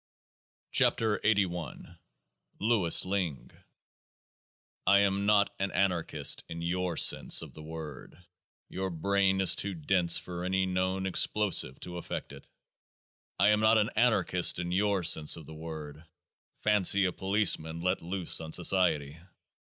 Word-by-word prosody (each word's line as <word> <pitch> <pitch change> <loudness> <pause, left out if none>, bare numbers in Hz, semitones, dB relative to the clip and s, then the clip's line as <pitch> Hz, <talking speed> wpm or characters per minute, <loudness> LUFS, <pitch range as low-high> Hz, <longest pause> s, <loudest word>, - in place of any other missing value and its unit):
" - - -56
40 110 -2 +1
97 110 - +4 0.2
KEOAAH 85 -2 -7
nA - - -17 0.6
LOUIS 105 -6 +3
LINGG 90 -8 -4 1.4
I 100 +1 +5
am 100 0 -1
not 100 -1 +2
an 95 0 -2
Anarchist 90 -3 0
in 85 0 -7
your 90 0 -3
sense - - +4
of - - -12
the 80 - -12
word: 80 0 -10 0.5
your 95 0 -5
brain 95 +3 0
is 95 - +4
too 100 -1 -3
dense 85 +1 +1
for 90 -1 -7
any 95 +1 -1
known 95 +1 -2
explosive 95 -7 +1
to 90 0 -8
affect 85 - -7
it. - - -15 0.9
I 100 +2 +4
am 105 0 +2
not 110 +1 +3
an 105 +2 0
Anarchist 110 -6 +2
in 85 0 -5
your 100 0 0
sense 80 -2 +4
of 80 - -12
the 80 - -12
word: 80 -1 -9 0.6
fancy 100 -2 +3
a 90 - -1
Policeman 90 -5 0
let 90 +2 -2
loose 90 0 0
on 80 -1 -9
Society 85 -5 +1
90 Hz, 145 wpm, -28 LUFS, 85-100 Hz, 1.4 s, I